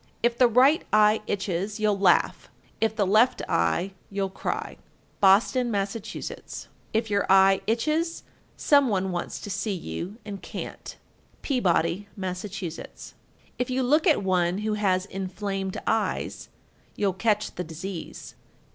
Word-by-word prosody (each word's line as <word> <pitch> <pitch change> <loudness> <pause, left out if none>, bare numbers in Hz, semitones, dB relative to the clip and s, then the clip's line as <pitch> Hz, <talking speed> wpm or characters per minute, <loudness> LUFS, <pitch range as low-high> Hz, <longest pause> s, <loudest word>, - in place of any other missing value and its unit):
If 240 0 +3
the 250 0 +5
right 260 +7 +4
eye 215 +1 +5
itches, 200 +1 -2
you'll 210 -2 +1
laugh; 185 -3 +2 0.3
if 220 -1 +1
the 205 -2 +2
left 215 +6 +3
eye, 85 - +1 0.2
you'll 195 -1 -2
cry. - - -4 0.4
Boston, 220 +6 +4
Mass. 200 -2 -1
1350. 225 -1 -7 0.2
If 220 -1 -1
your 200 0 +1
eye 195 0 +6
itches, 310 +9 0 0.3
some 285 -2 +4
one 190 -4 0
wants 175 -1 -4
to 205 - -6
see 200 +2 -2
you 175 - -6
and 200 -2 -7
can't. - - -7 0.5
Peabody, 190 - +1
Mass. 185 -2 -4
1351. 185 -5 -9
If 250 - -1
you 255 +1 0
look 300 +7 +3
at 300 - +4
one 180 -1 +1
who 215 - 0
has 190 -3 +1
inflamed 195 0 -4
eyes, 220 -1 -1 0.5
you'll 200 -2 0
catch 210 +2 0
the 180 - -4
disease. 170 +2 -7
200 Hz, 140 wpm, -26 LUFS, 190-225 Hz, 0.5 s, eye